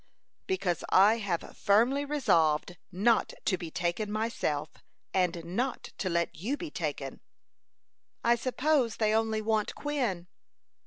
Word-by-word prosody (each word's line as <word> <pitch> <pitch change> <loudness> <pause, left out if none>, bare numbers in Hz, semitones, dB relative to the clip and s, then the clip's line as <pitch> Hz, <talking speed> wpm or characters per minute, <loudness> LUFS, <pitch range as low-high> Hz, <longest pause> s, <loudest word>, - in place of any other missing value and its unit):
"Because 190 - -1
I 205 +4 +6
have 190 -6 -3
firmly 240 +8 +3
resolved 180 - +2 0.2
not 215 +6 +2
to 190 - +2
be 175 -2 -6
taken 175 +6 -2
myself, 185 -9 -1 0.4
and 175 -3 0
not 240 +10 -3
to 185 - -1
let 170 -1 0
you 235 - -2
be 335 -2 -6
taken." 145 - -4 1.0
"I 235 - +5
suppose 255 0 +1
they 215 -1 +1
only 220 -1 +1
want 215 -1 0
Quin." 250 -12 -2
215 Hz, 125 wpm, -30 LUFS, 175-240 Hz, 1.0 s, I